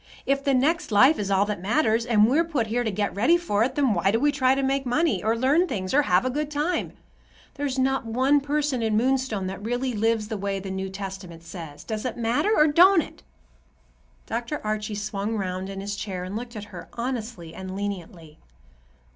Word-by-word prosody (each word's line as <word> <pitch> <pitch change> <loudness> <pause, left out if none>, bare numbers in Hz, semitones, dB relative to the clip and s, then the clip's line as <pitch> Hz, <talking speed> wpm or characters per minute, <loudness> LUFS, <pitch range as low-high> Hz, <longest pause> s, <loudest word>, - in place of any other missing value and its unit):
If 275 0 +1
the 275 -1 +2
next 300 +3 +1
life 260 +9 +5
is 200 -1 -2
all 195 0 +3
that 205 -4 -4
matters, 225 +2 +1
and 215 -3 +5
we're 290 +7 +3
put 300 -9 -1
here 235 +3 -1
to 225 - -1
get 205 0 -2
ready 245 +12 +4
for 225 -12 0
it, 255 +2 -1
then 275 -6 +2
why 185 +1 +1
do 225 +3 +2
we 290 +3 +3
try 265 -2 +2
to 275 - -1
make 270 +1 +1
money, 245 - +1
or 225 +2 +1
learn 285 +9 +3
things, 185 - -3
or 290 - +5
have 180 -5 +2
a 255 - 0
good 295 +2 -2
time? 300 +4 -1 0.6
There's 280 -2 -3
not 265 -2 0
one 260 +5 +3
person 290 -2 -1
in 220 -1 +1
Moonstone 255 -4 0
that 190 +1 -5
really 245 +3 -1
lives 220 0 0
the 215 - -4
way 200 0 -2
the 190 0 -6
New 190 0 -3
Testament 190 -3 -7
says. 160 -4 -9
Does 215 -1 -4
it 250 -2 -3
matter, 235 - +1
or 305 -9 +5
don't 340 +4 +6
it?" - - -13 1.0
Dr. 235 +6 -3
Archie 215 0 -2
swung 205 +1 -3
round 185 -1 -3
in 195 0 -6
his 200 +1 -4
chair 190 -3 -5
and 185 +3 -6
looked 235 +1 -6
at 210 - -5
her, 175 - -9
honestly 235 -9 -5
and 190 0 -7
leniently. 175 -6 -6
225 Hz, 215 wpm, -25 LUFS, 200-270 Hz, 1.0 s, don't